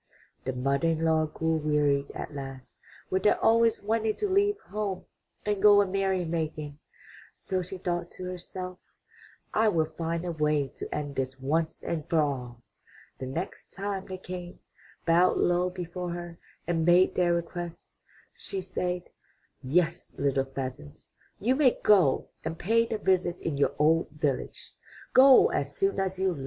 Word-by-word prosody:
The 130 Hz, -, -1 dB
mother 140 Hz, +5 st, 0 dB
in 165 Hz, 0 st, +1 dB
law 160 Hz, -1 st, +3 dB
grew 160 Hz, +1 st, -1 dB
wearied 150 Hz, -2 st, +1 dB
at -, -, -6 dB
last 135 Hz, -2 st, -8 dB, 0.4 s
with 190 Hz, -, +1 dB
their 210 Hz, -, +3 dB
always 230 Hz, -1 st, +3 dB
wanting 220 Hz, +1 st, 0 dB
to 415 Hz, -, -1 dB
leave 405 Hz, +2 st, +2 dB
home 205 Hz, -, -4 dB, 0.4 s
and 205 Hz, -2 st, 0 dB
go 205 Hz, -1 st, +8 dB
a 205 Hz, -, +4 dB
merry 190 Hz, -1 st, 0 dB
making, 155 Hz, -3 st, -3 dB, 0.6 s
so 185 Hz, -2 st, -2 dB
she 185 Hz, +2 st, -7 dB
thought 175 Hz, -1 st, -2 dB
to 185 Hz, -, -8 dB
herself, 180 Hz, 0 st, -6 dB, 0.7 s
''I 220 Hz, 0 st, +3 dB
will 160 Hz, -3 st, +2 dB
find 165 Hz, +2 st, -3 dB
a 175 Hz, -, -2 dB
way 150 Hz, -3 st, +1 dB
to -, -, -5 dB
end 145 Hz, -1 st, -3 dB
this 130 Hz, 0 st, -3 dB
once 155 Hz, +5 st, -1 dB
and 160 Hz, -3 st, -3 dB
for 165 Hz, -, +3 dB
all." 125 Hz, -5 st, -2 dB, 0.6 s
The 130 Hz, -, -4 dB
next 165 Hz, +8 st, -6 dB
time 195 Hz, -1 st, -4 dB
they 185 Hz, -, -5 dB
came, 180 Hz, -1 st, -8 dB, 0.5 s
bowed 175 Hz, +2 st, +4 dB
low 175 Hz, +1 st, +2 dB
before 180 Hz, 0 st, -5 dB
her, 175 Hz, -1 st, -7 dB, 0.3 s
and 165 Hz, -1 st, 0 dB
made 175 Hz, +2 st, +5 dB
their 175 Hz, -1 st, +2 dB
request, 170 Hz, 0 st, -6 dB, 0.4 s
she 195 Hz, -, -5 dB
said: 180 Hz, -1 st, -3 dB, 0.6 s
*'Yes, 165 Hz, +5 st, 0 dB
little 135 Hz, -1 st, +1 dB
pheasants, 130 Hz, -, -7 dB, 0.3 s
you 240 Hz, +6 st, +2 dB
may 265 Hz, -3 st, +4 dB
go 185 Hz, -11 st, +4 dB
and 160 Hz, +1 st, -4 dB
pay 230 Hz, +6 st, +2 dB
the 225 Hz, -, -2 dB
visit 185 Hz, -3 st, +1 dB
in 160 Hz, -, -3 dB
your 140 Hz, -1 st, +1 dB
old 160 Hz, +3 st, +3 dB
village. 145 Hz, -2 st, -3 dB, 0.4 s
Go 265 Hz, 0 st, +8 dB
as -, -, -2 dB
soon 390 Hz, 0 st, +1 dB
as 190 Hz, -1 st, -1 dB
you 190 Hz, -1 st, +1 dB
like. 150 Hz, -, -8 dB
175 Hz, 165 wpm, -28 LUFS, 150-190 Hz, 0.7 s, go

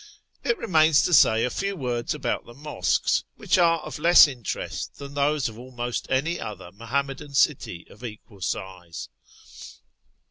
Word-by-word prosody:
It 480 Hz, -, +1 dB
remains 160 Hz, -6 st, +4 dB
to 180 Hz, -, 0 dB
say 115 Hz, -7 st, +5 dB
a 125 Hz, -, -2 dB
few 195 Hz, 0 st, -2 dB
words 125 Hz, -4 st, -2 dB
about 135 Hz, -5 st, -3 dB
the 120 Hz, -, -12 dB
mosques, 150 Hz, +1 st, 0 dB
which 205 Hz, -2 st, +1 dB
are 165 Hz, -2 st, +4 dB
of -, -, -7 dB
less 170 Hz, 0 st, +8 dB
interest 125 Hz, -7 st, -5 dB
than 140 Hz, 0 st, -9 dB
those 145 Hz, 0 st, +1 dB
of 110 Hz, 0 st, -9 dB
almost 120 Hz, -1 st, -4 dB
any 160 Hz, +6 st, 0 dB
other 95 Hz, -4 st, -7 dB
Muham 115 Hz, +8 st, -1 dB
madan 140 Hz, +1 st, -9 dB
city 130 Hz, -, +1 dB
of 105 Hz, -, -17 dB
equal 105 Hz, -3 st, -10 dB
size. 90 Hz, -2 st, -5 dB
135 Hz, 155 wpm, -25 LUFS, 115-155 Hz, -, less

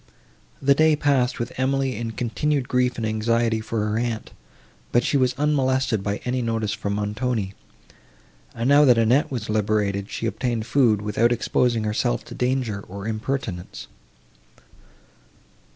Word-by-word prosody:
This 140 Hz, 0 st, +3 dB
day 155 Hz, -1 st, +5 dB
passed 140 Hz, -4 st, +1 dB
with 120 Hz, -, -4 dB
Emily 135 Hz, 0 st, 0 dB
in 115 Hz, +2 st, -4 dB
continued 130 Hz, +4 st, -1 dB
grief 125 Hz, -1 st, +1 dB
and 115 Hz, -, -2 dB
anxiety 110 Hz, +1 st, +1 dB
for 110 Hz, -1 st, -2 dB
her 105 Hz, +1 st, -1 dB
aunt; 115 Hz, -2 st, -3 dB, 0.6 s
but 120 Hz, -, +3 dB
she -, -, 0 dB
was 130 Hz, -2 st, +2 dB
unmolested 130 Hz, -6 st, +1 dB
by 100 Hz, +1 st, -2 dB
any 125 Hz, +1 st, -1 dB
notice 115 Hz, -3 st, -1 dB
from 100 Hz, -2 st, -3 dB
Montoni; 105 Hz, 0 st, -2 dB, 1.0 s
and, 115 Hz, +2 st, -1 dB
now 145 Hz, +2 st, +6 dB
that 125 Hz, -4 st, +6 dB
Annette 115 Hz, +5 st, +3 dB
was 120 Hz, -5 st, -4 dB
liberated, 105 Hz, -2 st, 0 dB
she -, -, -4 dB
obtained 115 Hz, -1 st, -2 dB
food, 115 Hz, -4 st, +2 dB
without 105 Hz, +3 st, +2 dB
exposing 120 Hz, -1 st, +1 dB
herself 105 Hz, -, -1 dB
to -, -, -9 dB
danger, 125 Hz, -5 st, -1 dB
or 100 Hz, +2 st, -7 dB
impertinence. 110 Hz, -5 st, -4 dB
115 Hz, 145 wpm, -23 LUFS, 110-130 Hz, 1.0 s, now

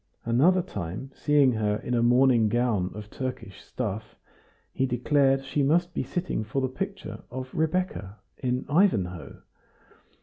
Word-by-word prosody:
Another 160 Hz, +11 st, +4 dB
time 95 Hz, -, -6 dB
seeing 145 Hz, -3 st, +3 dB
her 105 Hz, -2 st, 0 dB
in 125 Hz, -, -4 dB
a. 120 Hz, -, +2 dB
morning 120 Hz, -2 st, +4 dB
gown 110 Hz, -5 st, +1 dB
of 105 Hz, 0 st, -9 dB
Turkish 130 Hz, -7 st, -6 dB
stuff, 110 Hz, -3 st, -5 dB, 0.6 s
he 135 Hz, -, 0 dB
declared 135 Hz, +2 st, +2 dB
she 145 Hz, +2 st, -1 dB
must 170 Hz, +5 st, +2 dB
be -, -, -1 dB
sitting 175 Hz, -10 st, -2 dB
for 110 Hz, +6 st, -2 dB
the 130 Hz, -, +1 dB
picture 195 Hz, +8 st, -5 dB
of 130 Hz, +1 st, -7 dB
Rebecca 160 Hz, -, -1 dB, 0.2 s
in 125 Hz, -1 st, -1 dB
"Ivanhoe." 100 Hz, -, +1 dB
130 Hz, 140 wpm, -27 LUFS, 110-145 Hz, 0.6 s, Another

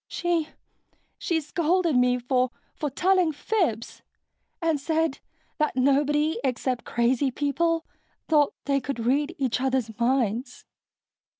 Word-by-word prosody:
She... 340 Hz, -3 st, -1 dB, 0.7 s
she 335 Hz, -3 st, 0 dB
scolded 335 Hz, +1 st, +1 dB
me 250 Hz, 0 st, +3 dB
for... 250 Hz, +1 st, +1 dB, 0.2 s
for 300 Hz, -, -3 dB
telling 365 Hz, +4 st, +2 dB
fibs... 300 Hz, -, -2 dB, 0.6 s
and 325 Hz, -3 st, +1 dB
said 320 Hz, 0 st, 0 dB, 0.4 s
that 305 Hz, -3 st, +1 dB
nobody 290 Hz, +4 st, +2 dB
except 255 Hz, -1 st, -1 dB
crazy 245 Hz, +3 st, +1 dB
people 320 Hz, +5 st, 0 dB, 0.4 s
thought 300 Hz, -3 st, +3 dB
they 275 Hz, -1 st, +1 dB
could 275 Hz, 0 st, -4 dB
read 290 Hz, +7 st, +1 dB
each 255 Hz, -3 st, 0 dB
other's 260 Hz, -4 st, -1 dB
minds." 240 Hz, -1 st, 0 dB
280 Hz, 115 wpm, -26 LUFS, 255-320 Hz, 0.7 s, me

